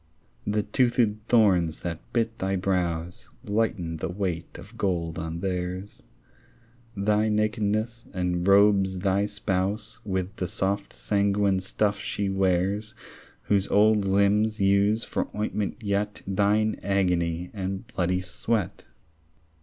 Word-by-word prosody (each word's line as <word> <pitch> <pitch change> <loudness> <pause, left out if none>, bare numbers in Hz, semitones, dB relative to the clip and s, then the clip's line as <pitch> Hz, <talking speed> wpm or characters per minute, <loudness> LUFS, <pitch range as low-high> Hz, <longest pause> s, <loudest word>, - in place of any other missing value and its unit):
The 105 0 +1
toothèd 120 -4 +2
thorns 90 -8 +3
that 85 -2 -4
bit 115 -1 -1
thy 95 +1 0
brows 90 -3 -2
Lighten 100 -6 -1
the 80 - -3
weight 90 -3 -3
of - - -12
gold 85 -4 -1
on 80 +1 -4
theirs; 90 +1 -4 1.0
Thy 105 +2 +2
nakedness 110 +2 0
enrobes 95 +2 +3
thy 100 +1 +2
spouse 105 +2 -2
With 95 0 -3
the 90 - -2
soft 100 +3 -2
sanguine 100 -1 +1
stuff 100 +2 0
she 100 -1 -2
wears 95 +3 0 0.5
Whose 100 -1 +1
old 105 0 +4
limbs 100 +3 +2
use 100 +3 +3
for - - -2
ointment 105 +1 -2
yet 105 0 -1
Thine 105 +3 +1
agony 90 -3 0
and 95 -1 -4
bloody 90 -5 -1
sweat. 95 +2 -2
100 Hz, 115 wpm, -26 LUFS, 90-105 Hz, 1.0 s, old